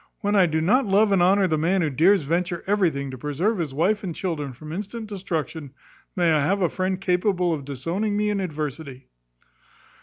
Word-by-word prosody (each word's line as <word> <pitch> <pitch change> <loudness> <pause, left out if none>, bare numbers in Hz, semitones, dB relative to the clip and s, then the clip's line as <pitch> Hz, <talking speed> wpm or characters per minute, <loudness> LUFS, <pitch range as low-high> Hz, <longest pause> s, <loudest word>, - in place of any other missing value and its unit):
When 205 +1 0
I 190 -3 +5
do 160 0 0
not 235 +9 +3
love 200 +2 +3
and 195 -2 +3
honour 190 +2 +4
the 160 -4 0
man 180 +3 +1
who 150 - 0
dares 170 +6 +4
venture 175 +3 -1
everything 170 -9 0
to 130 - -9
preserve 165 - -1
his 160 -5 -2
wife 190 +10 0
and 175 -4 -4
children 155 -7 -3
from 150 +5 -10
instant 210 +5 -5
destruction, 165 - -5 0.4
may 175 -2 +2
I 155 -2 +2
have 195 +7 +1
a 175 - +2
friend 185 0 -2
capable 180 -1 +1
of 145 -4 -5
disowning 170 +10 -2
me 210 0 +1
in 205 - -1
adversity!" 150 -6 -5
175 Hz, 195 wpm, -24 LUFS, 155-200 Hz, 0.4 s, I